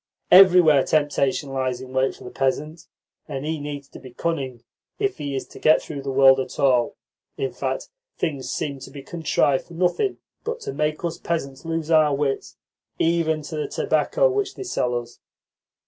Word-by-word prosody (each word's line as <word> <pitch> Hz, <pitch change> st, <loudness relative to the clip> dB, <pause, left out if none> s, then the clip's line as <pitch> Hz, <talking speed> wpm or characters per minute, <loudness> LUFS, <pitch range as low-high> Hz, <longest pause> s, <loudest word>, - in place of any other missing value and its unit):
Everywhere 180 Hz, -6 st, +8 dB
temptation 145 Hz, -2 st, +1 dB
lies 130 Hz, -2 st, -1 dB
in 130 Hz, 0 st, -10 dB
wait 130 Hz, 0 st, +1 dB
for -, -, -14 dB
the 125 Hz, -, -8 dB
peasant, 150 Hz, +4 st, -2 dB, 0.4 s
and 135 Hz, +2 st, -5 dB
he 160 Hz, 0 st, -2 dB
needs 145 Hz, -1 st, -6 dB
to -, -, -11 dB
be 130 Hz, -, -11 dB
cunning 130 Hz, -4 st, -3 dB, 0.3 s
if 405 Hz, -2 st, -1 dB
he 140 Hz, -1 st, -3 dB
is 135 Hz, -, -3 dB
to -, -, -12 dB
get 155 Hz, -, +5 dB
through 145 Hz, -3 st, -7 dB
the 135 Hz, -, -5 dB
world 135 Hz, 0 st, +6 dB
at 130 Hz, -, -5 dB
all. 125 Hz, -4 st, +3 dB, 0.4 s
In 410 Hz, -, -2 dB
fact, -, -, -3 dB, 0.3 s
things 140 Hz, -6 st, -2 dB
seem 140 Hz, 0 st, -3 dB
to -, -, -10 dB
be 135 Hz, 0 st, -10 dB
contrived 145 Hz, -4 st, +1 dB
for 170 Hz, -, -12 dB
nothing 185 Hz, -, +1 dB, 0.3 s
but 470 Hz, +1 st, -3 dB
to 425 Hz, -2 st, -5 dB
make 150 Hz, +2 st, -1 dB
us 170 Hz, 0 st, -3 dB
peasants 140 Hz, -5 st, -3 dB
lose 165 Hz, -1 st, -2 dB
our 155 Hz, -3 st, +5 dB
wits, 140 Hz, -1 st, -2 dB, 0.4 s
even 160 Hz, -2 st, +1 dB
to 150 Hz, +2 st, -6 dB
the 150 Hz, -, -2 dB
tobacco -, -, +1 dB
which 410 Hz, -3 st, -1 dB
they -, -, -6 dB
sell 125 Hz, -, -1 dB
us. 120 Hz, 0 st, -13 dB
150 Hz, 185 wpm, -23 LUFS, 135-165 Hz, 0.4 s, Everywhere